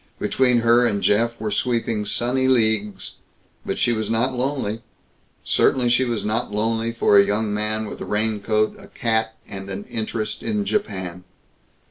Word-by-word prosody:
Between 125 -2 +2
her 120 +1 +5
and 100 -3 -1
Jeff 115 +3 +2
were 110 -1 -3
sweeping 115 -1 0
sunny 130 +4 +1
leagues. 110 -6 +1 0.5
But - - -3
she 120 - +2
was 110 -2 -2
not 115 +4 +1
lonely. 125 -4 -2 0.6
Certainly 125 -2 +2
she 125 +2 +3
was 120 -3 -2
not 110 +2 -1
lonely 115 +2 0
for 110 -3 +4
a - - +7
young 105 +1 -1
man 105 +1 -1
with - - -8
a - - -4
raincoat, 110 0 0
a - - -13
cat, 110 -1 -1
and 95 0 -8
an 100 +1 -5
interest 110 0 -4
in 210 -2 -1
Japan. 95 - -3
110 Hz, 160 wpm, -22 LUFS, 105-120 Hz, 0.6 s, a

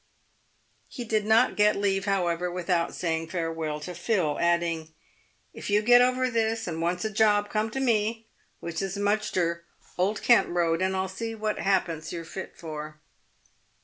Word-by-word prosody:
He 245 - -7
did 215 -2 -1
not 225 +3 +4
leave, 200 -2 +2
however, 180 -3 0
without 175 -1 -1
saying 165 -2 -2
farewell 165 -3 -3
to 180 +4 -6
Phil, 175 -4 0
adding, 170 -2 0 0.3
" - - -40
If - - -7
you 205 +1 +3
get 245 +2 +7
over 255 +1 +2
this, 225 -1 0
and 165 -2 -4
wants 175 +3 -1
a 220 - -1
job, 205 -1 +2
come 215 +1 0
to 270 - -4
me, 225 -3 0 0.4
which 170 0 -4
is 195 0 -3
Mudgster, 200 -5 0 0.4
Old 200 +4 0
Kent 240 - +5
road, 170 -1 +1
and 190 0 +1
I'll 190 0 -1
see 225 +4 -5
what 215 -1 -2
ha'pence 170 -5 0
you're 170 -1 -5
fit 190 +3 -8
for." 155 -1 -7
190 Hz, 165 wpm, -27 LUFS, 170-215 Hz, 0.4 s, get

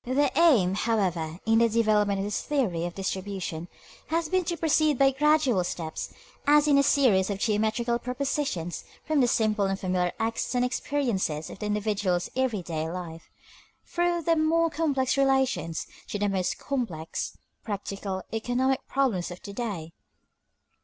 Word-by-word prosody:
The 265 +3 +1
aim, 245 - +5
however, 180 -7 0
in 225 0 +4
the 230 0 +4
development 210 -3 +2
of 195 - -2
this 205 - -2
theory 195 - 0
of 175 - -8
distribution, 190 -3 -4 0.4
has 325 0 -1
been 370 0 +2
to 340 0 -2
proceed 310 -2 +2
by 270 +1 +5
gradual 285 -7 +3
steps, 165 -2 -4 0.4
as 295 0 +5
in 285 -1 +5
a - - +6
series 230 -10 +3
of 200 - -2
geometrical 220 +3 0
propositions, 250 - -2 0.2
from 310 -2 +1
the 245 - +4
simple 215 -3 +2
and 195 0 -1
familiar 180 -1 0
acts 225 +2 -2
and 245 0 +3
experiences 235 - -1
of - - -10
the 210 - -3
individual's 205 -4 0
every 250 -7 0
day 160 -1 -3
life, 170 -2 -7 0.6
through 345 -1 0
the 330 +1 +3
more 325 +1 +2
complex 280 -5 0
relations, 265 -11 +1 0.2
to - - -3
the 205 0 0
most 190 -2 -1
complex, 220 - -4 0.3
practical, 200 -2 -4
economic 250 +4 +1
problems 250 -10 0
of 175 0 -8
the 200 - -7
day. 200 -8 -4
220 Hz, 155 wpm, -27 LUFS, 190-275 Hz, 0.6 s, a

